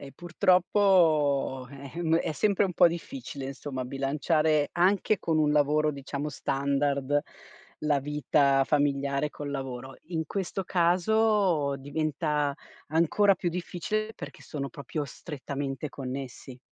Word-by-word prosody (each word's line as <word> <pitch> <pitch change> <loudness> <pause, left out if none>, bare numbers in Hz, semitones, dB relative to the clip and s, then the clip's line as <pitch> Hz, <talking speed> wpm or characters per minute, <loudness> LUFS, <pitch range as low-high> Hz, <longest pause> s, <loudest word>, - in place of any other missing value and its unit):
Eh 140 -1 -10
purtroppo 175 -7 +2
eh, 140 0 -10
ehm, 165 -1 +2
è - - -2
sempre 200 +5 +2
un 185 - -2
po' 175 +1 +6
difficile 170 - -5
insomma 135 -1 -5
bilanciare 150 +3 +1
anche 190 +3 +2
con 160 -2 0
un 150 -1 +3
lavoro, 150 +1 +3
diciamo, 140 +1 -5
standard 140 0 0 0.6
la 150 -2 +2
vita 140 -1 +2
familiare 140 0 +1
col 145 -1 -6
lavoro. 130 -1 -5
In 160 -2 -2
questo 195 +2 -3
caso 180 -3 +2
diventa 150 0 -1 0.4
ancora 170 +6 +3
più 175 - -1
difficile 180 +5 -3
perché - - -9
sono 140 -3 -5
proprio 145 0 -5
strettamente 140 0 -5
connessi. 130 -1 -7
150 Hz, 120 wpm, -28 LUFS, 140-175 Hz, 0.6 s, po